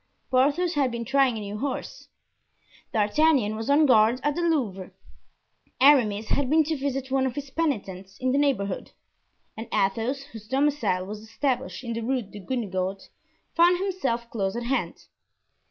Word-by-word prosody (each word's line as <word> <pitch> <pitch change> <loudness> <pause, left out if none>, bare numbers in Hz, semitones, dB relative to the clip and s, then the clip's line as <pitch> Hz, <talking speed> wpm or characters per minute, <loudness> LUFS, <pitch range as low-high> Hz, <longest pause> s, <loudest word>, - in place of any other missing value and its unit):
Porthos 285 +7 +2
had 280 -3 +2
been 235 -1 -5
trying 265 -2 +2
a - - -5
new 205 +1 -6
horse; 285 - -5 0.8
D'Artagnan 220 +1 +2
was 220 +3 -5
on 295 +2 +5
guard 230 -1 +4
at 295 - +1
the 345 - -3
Louvre; 240 - -1 0.9
Aramis 225 -7 +4
had 280 -3 +1
been 315 +2 +4
to 315 +1 -2
visit 270 -1 -3
one 265 -1 +2
of 250 - -5
his 280 -2 -6
penitents 195 - -3
in 255 0 0
the 275 - +2
neighborhood; 220 -10 -1 0.6
and 225 +1 -7
Athos, 225 +8 0
whose 220 -2 -11
domicile 270 -8 +1
was 210 +2 -7
established 260 +4 -3
in 235 -2 -4
the 230 - -3
Rue 250 +1 -1
Guenegaud, 195 -2 -4 0.4
found 345 +1 +5
himself 350 -12 -2
close 195 -2 -2
at 240 - -3
hand. 265 +3 -2
255 Hz, 155 wpm, -26 LUFS, 215-285 Hz, 0.9 s, on